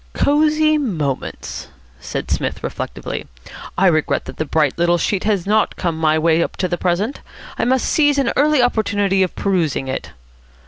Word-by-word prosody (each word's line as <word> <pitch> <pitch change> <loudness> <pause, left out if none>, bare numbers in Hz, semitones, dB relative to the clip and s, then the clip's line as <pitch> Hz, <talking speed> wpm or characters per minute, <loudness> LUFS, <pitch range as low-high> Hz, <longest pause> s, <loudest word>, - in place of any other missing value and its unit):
"Cosy 305 +1 +3
Moments?" 155 - -3 0.3
said - - -5
Psmith - - -2
reflectively. - - -5 0.5
"I 190 - +3
regret 155 -4 +2
that - - -9
the 155 - -1
bright 150 -1 +1
little 175 0 +3
sheet 190 +3 -1
has 205 -5 +1
not 215 +2 +2
come 170 -3 -2
my 160 -1 +2
way 165 +1 +3
up - - -2
to 185 - 0
the 175 - -1
present. 185 +9 -1 0.4
I - - +1
must 260 +1 +2
seize 290 -2 +3
an 270 -4 +1
early 295 -2 +3
opportunity 205 -5 +1
of 185 - 0
perusing 170 -9 0
it." 130 - -4
190 Hz, 170 wpm, -19 LUFS, 165-250 Hz, 0.5 s, Cosy